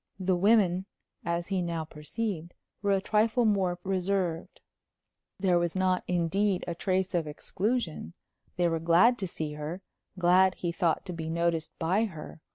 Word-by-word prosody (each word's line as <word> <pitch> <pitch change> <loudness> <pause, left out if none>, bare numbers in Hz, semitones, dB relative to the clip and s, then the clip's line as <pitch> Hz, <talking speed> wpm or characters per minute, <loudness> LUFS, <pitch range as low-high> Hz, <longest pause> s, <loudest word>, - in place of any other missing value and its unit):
The 185 -1 +1
women, 190 -1 +3 0.4
as 170 +1 -2
he 190 -2 0
now 170 -2 -2
perceived, 170 +3 -5 0.3
were 200 - 0
a 195 - +2
trifle 220 +3 +2
more 190 -4 +2
reserved. 185 -3 -1 0.8
There 185 -2 +3
was 175 0 -1
not, 185 -1 +1
indeed, 180 +3 +1
a 170 - -1
trace 185 +2 -1
of 170 -3 0
exclusion. 175 - -3 0.4
They 175 -1 +2
were 165 -1 0
glad 175 +10 +4
to 190 - -2
see 155 -3 -4
her; 150 +5 -6 0.3
glad, 185 +1 +4
he 175 - -2
thought, 170 -1 0
to 180 - -5
be 160 -1 -5
noticed 170 -1 -1
by 185 +7 +1
her. 160 -4 -9
180 Hz, 160 wpm, -29 LUFS, 170-195 Hz, 0.8 s, glad